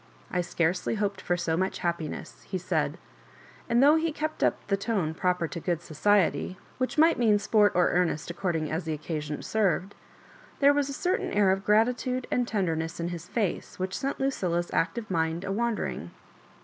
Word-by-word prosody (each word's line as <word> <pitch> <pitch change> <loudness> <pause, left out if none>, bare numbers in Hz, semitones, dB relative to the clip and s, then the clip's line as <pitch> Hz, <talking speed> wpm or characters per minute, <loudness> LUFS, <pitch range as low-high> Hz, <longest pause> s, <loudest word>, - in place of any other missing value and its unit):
I 180 - +1
scarcely 175 +4 0
hoped 200 -2 -1
for 175 - 0
so 165 -2 0
much 190 +3 -1
happiness," 165 - -3
he - - -1
said; - - -1 0.7
and 235 +3 +4
though 295 +3 +7
he 325 0 0
kept 310 +1 -3
up - - +3
the 200 - +1
tone 195 -6 -1
proper 180 0 0
to 170 - -5
good 170 0 -1
society, 185 +2 +1 0.2
which 255 +4 -1
might 325 -1 +5
mean 220 -3 +4
sport 205 0 +3
or 180 -1 +4
earnest 175 -2 0
according 170 -4 -2
as 160 +2 -2
the 160 - -1
occasion 150 -1 -4
served, 200 -2 0 0.7
there 280 0 +6
was 285 -1 +1
a - - -4
certain 360 +6 -1
air 205 -2 +4
of 195 +1 0
gratitude 245 +4 +2
and 245 -1 +1
tenderness 165 -7 -1
in 170 +1 -2
his 175 -2 -6
face 210 -7 -2
which 185 +1 -3
sent 275 0 -2
Lucilla's 180 -11 -1
active 215 +5 -1
mind 165 0 0
a 195 - -3
wondering. 220 - -2
190 Hz, 180 wpm, -28 LUFS, 170-230 Hz, 0.7 s, though